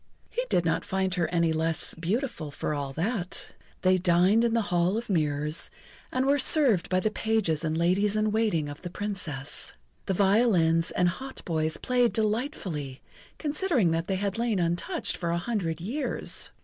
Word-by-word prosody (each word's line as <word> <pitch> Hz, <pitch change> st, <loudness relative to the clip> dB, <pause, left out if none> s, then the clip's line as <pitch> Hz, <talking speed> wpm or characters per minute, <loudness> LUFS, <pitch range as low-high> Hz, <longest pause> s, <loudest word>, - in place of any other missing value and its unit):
He -, -, -1 dB
did 175 Hz, -, +2 dB
not 165 Hz, -, +1 dB
find 190 Hz, -1 st, -1 dB
her 175 Hz, -3 st, +1 dB
any 170 Hz, -1 st, +1 dB
the 160 Hz, -, -1 dB
less 160 Hz, -1 st, -1 dB
beautiful 185 Hz, -, -2 dB
for 145 Hz, +1 st, -3 dB
all 140 Hz, -2 st, -3 dB
that. 180 Hz, -, -2 dB, 0.3 s
They 185 Hz, 0 st, +4 dB
dined 180 Hz, +5 st, +4 dB
in 235 Hz, -1 st, +2 dB
the 230 Hz, -, +2 dB
Hall 175 Hz, +4 st, +2 dB
of 235 Hz, -2 st, -4 dB
Mirrors, 150 Hz, -2 st, 0 dB, 0.4 s
and 255 Hz, +1 st, 0 dB
were 285 Hz, +1 st, +3 dB
served 260 Hz, -, +3 dB
by 185 Hz, -, +2 dB
the 215 Hz, +3 st, 0 dB
pages 215 Hz, -9 st, +1 dB
and 160 Hz, 0 st, -1 dB
ladies 190 Hz, +5 st, +2 dB
in 215 Hz, 0 st, +1 dB
waiting 210 Hz, -9 st, +1 dB
of 145 Hz, +1 st, -8 dB
the 175 Hz, -, -5 dB
Princess. 175 Hz, -9 st, -4 dB, 0.3 s
The 190 Hz, -, +1 dB
violins 190 Hz, -5 st, +3 dB
and 180 Hz, -, +2 dB
hautboys 170 Hz, -7 st, -2 dB
played 245 Hz, -2 st, +2 dB
delightfully 210 Hz, -, -2 dB, 0.3 s
considering 295 Hz, -, +1 dB
that 165 Hz, +1 st, -1 dB
they 190 Hz, -, 0 dB
had 200 Hz, +3 st, -2 dB
lain 230 Hz, -3 st, +1 dB
untouched 175 Hz, -, -1 dB
for 170 Hz, -, -2 dB
a 170 Hz, -, +1 dB
hundred 175 Hz, -5 st, -2 dB
years. 235 Hz, -, -2 dB
185 Hz, 175 wpm, -27 LUFS, 165-225 Hz, 0.4 s, They